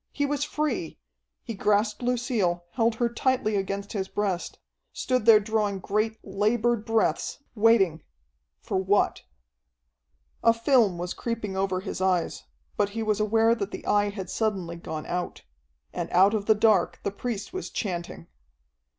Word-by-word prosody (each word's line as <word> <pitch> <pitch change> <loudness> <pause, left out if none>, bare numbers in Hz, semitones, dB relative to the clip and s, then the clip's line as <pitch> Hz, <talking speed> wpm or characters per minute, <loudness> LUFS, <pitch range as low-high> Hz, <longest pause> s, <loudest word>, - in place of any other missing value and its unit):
He 285 - -1
was 285 0 -1
free. 295 - -2 0.5
He 230 - -5
grasped 210 +2 +1
Lucille, 240 -8 0
held 230 +1 +1
her 240 +1 +1
tightly 235 -2 0
against 200 +1 -3
his 190 -3 -2
breast, 195 -4 -2 0.3
stood 255 -3 -1
there 220 -2 +9
drawing 210 -1 -1
great, 215 +4 -1
labored 215 +3 0
breaths, 225 -1 0 0.2
waiting 210 -7 +3 0.6
for - - -2
what? 190 +2 +1 1.2
A 230 0 +5
film 230 -6 +3
was 175 +1 -3
creeping 230 -4 -4
over 190 -1 0
his 190 -1 -5
eyes, 185 -2 0 0.3
but 200 - +2
he 225 - 0
was 215 -1 0
aware 225 +2 +3
that 205 -4 -3
the - - -8
Eye 205 0 +2
had 195 -2 -6
suddenly 195 -6 -1
gone 160 -2 -6
out. 180 0 -4 0.5
And - - -3
out 190 +4 +5
of 205 -2 -2
the 220 - +6
dark 210 -4 +3
the 200 - -1
priest 235 - -5
was 375 - -4
chanting. 175 - -4
210 Hz, 150 wpm, -26 LUFS, 190-230 Hz, 1.2 s, there